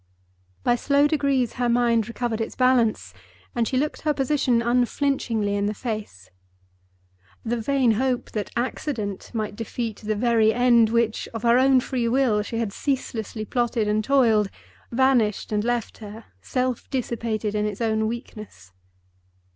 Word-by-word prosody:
By 245 0 +2
slow 280 +3 +3
degrees 280 -5 +1
her 245 - +2
mind 235 -2 +2
recovered 235 -1 -3
its 225 - -4
balance 235 - +2 0.4
and 235 -2 0
she 260 - -1
looked 295 +3 -1
her 300 -2 0
position 270 -3 +1
unflinchingly 240 -3 0
in 200 0 0
the 210 - -2
face. 205 - -6 1.1
The 235 +1 -1
vain 265 0 +2
hope 250 +3 -1
that 210 -2 -3
accident 235 -4 -3
might 215 -2 -3
defeat 225 0 -4
the 215 0 -3
very 225 -1 +3
end 240 -2 +4
for - - -5
which, 230 -2 0
of 225 - -5
her 235 +1 +5
own 265 -1 +5
free 245 -2 -2
will, 235 -4 +2
she 220 +2 -5
had 225 -3 -2
ceaselessly 230 -5 -3
plotted 240 -1 0
and 210 +1 +1
toiled, 225 -6 +3 0.4
vanished 240 -5 +2
and 210 0 0
left 240 -1 -2
her; 215 +1 -10 0.2
self 255 -2 -2
dissipated 230 -4 -2
in 210 0 0
its 210 -1 -5
own 220 -1 0
weakness. 215 - -8
235 Hz, 155 wpm, -24 LUFS, 215-255 Hz, 1.1 s, her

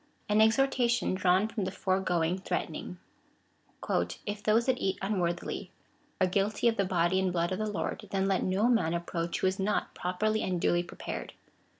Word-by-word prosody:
An 210 +1 +4
exhortation 240 0 +3
drawn 185 +2 +3
from 220 -2 -3
the 185 - -1
foregoing 185 -2 0
threatening. 185 - -4 0.6
" - - -4
If 205 0 -4
those 220 +2 +3
that 260 -2 +1
eat 190 0 0
unworthily 180 -4 -2 0.5
are 185 - +4
guilty 200 +4 +1
of 230 - +3
the 200 - +1
body 180 0 +2
and 190 -1 +1
blood 170 0 0
of 185 - -2
the 215 0 -1
Lord, 205 - -3
then 195 0 0
let 195 -1 +1
no 190 +5 +2
man 180 -9 +2
approach 170 0 -3
who - - +1
is 190 +1 +1
not 205 +2 0
properly 215 +5 -1
and 180 -2 -1
duly 175 +1 +2
prepared. 175 - -6
190 Hz, 180 wpm, -30 LUFS, 180-215 Hz, 0.6 s, An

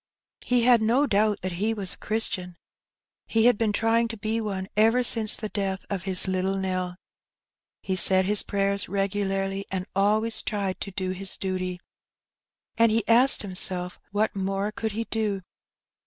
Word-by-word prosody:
He 245 -1 +1
had 240 -2 +5
no 240 +6 +3
doubt 210 -3 +1
that 185 - -2
he 210 +6 -1
was 195 -3 -3
a - - -16
Christian, 190 -5 -2 0.7
He 225 0 +2
had 245 -1 +6
been 215 0 0
trying 230 +2 +1
to 225 0 -7
be 220 +2 -2
one 195 -3 -4
ever 225 +4 +3
since 225 -3 +4
the 215 - -4
death 195 -2 -3
of 190 -2 -3
his 185 0 +1
little 190 +1 -1
Nell; 185 -1 -2 0.9
he 190 - -1
said 185 +1 +4
his 205 +1 +2
prayers 200 -1 -1
regularly, 195 0 -1
and 185 -1 -3
always 215 +3 +2
tried 195 -4 -3
to - - -4
do 185 -1 -3
his 190 +1 -4
duty; 185 -1 -3 1.0
and 230 -1 +5
he 220 -1 0
asked 245 +3 +6
himself 180 -2 -1
what 210 +2 -1
more 195 +1 -2
could 220 0 -4
he 225 +2 -2
do. 215 -4 -2
200 Hz, 170 wpm, -25 LUFS, 190-220 Hz, 1.0 s, had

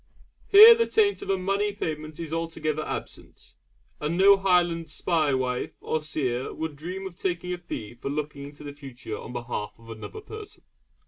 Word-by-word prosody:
Here 430 +4 +11
the 460 0 +1
taint 410 -2 +2
of - - -7
a 195 - +2
money 200 +2 0
payment 155 -5 -5
is 165 -2 -5
altogether 160 -2 -2
absent; - - -8 0.5
and 155 +3 -2
no 200 +1 +8
Highland 175 -4 +2
'spae 155 -2 +1
wife' 125 -1 -2
or 155 - -2
seer 130 -5 -2
would 160 -2 -5
dream 180 +6 -6
of 190 -2 -7
taking 180 -1 -2
a 180 - -5
fee 115 -10 -6
for 120 +3 -6
looking 145 -1 -4
into 145 +1 -11
the 145 -1 -7
future 135 -6 -8
on - - -8
behalf 120 -3 -5
of 115 0 -13
another 115 - -8
person. 430 0 -10
160 Hz, 180 wpm, -26 LUFS, 140-190 Hz, 0.5 s, Here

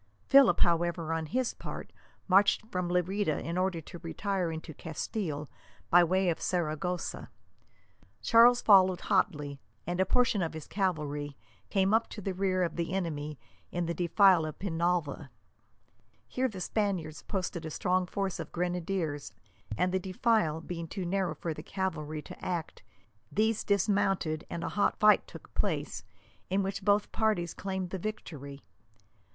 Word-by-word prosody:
Philip, 275 -2 +6
however, 170 -1 +2
on 160 -1 -2
his 250 +6 0
part, - - -8 0.3
marched 200 +3 +4
from 180 -1 -1
Lerida 180 -1 +1
in 170 - -4
order 185 -2 0
to 170 +2 -10
retire 180 +1 -2
into 160 0 -7
Castile 155 -1 -4 0.4
by 175 0 +8
way 185 +2 +2
of 165 - -1
Saragossa. 175 0 -2 0.9
Charles 240 - +6
followed 185 -3 +6
hotly, 150 -8 0 0.3
and 175 +2 -2
a - - +3
portion 240 -4 +3
of 165 -2 -2
his 160 - -6
cavalry 150 -7 -2 0.3
came 195 +1 +2
up 225 +1 +3
to - - -8
the 195 -1 -3
rear 185 -1 +1
of 170 -2 -2
the 170 +1 -2
enemy 155 -5 -3 0.3
in 175 -1 -1
the 170 - -1
defile 180 +1 +4
of 155 -1 -5
Penalva. 170 -5 -1 1.0
Here 260 +1 0
the 195 -6 -7
Spaniards 180 -7 -1
posted 185 -3 -3
a 160 - -4
strong 180 +3 0
force 195 -1 -2
of - - -6
grenadiers, 175 - -2 0.4
and 180 - +2
the 190 - +1
defile 185 -3 +1
being 170 0 -5
too 185 +2 -4
narrow 180 -2 0
for 165 +2 -3
the - - -8
cavalry 155 -6 -3
to - - -11
act, 175 -3 -3 0.5
these 220 +1 +1
dismounted, 195 -5 +1
and 170 - -4
a - - -2
hot 205 - +1
fight 210 -1 +5
took - - -13
place, - - -1 0.5
in 195 +2 +1
which 195 +1 -3
both 205 +1 +2
parties 210 -7 0
claimed 190 -2 -4
the 190 - -3
victory. 150 -9 -6
180 Hz, 155 wpm, -30 LUFS, 160-195 Hz, 1.0 s, by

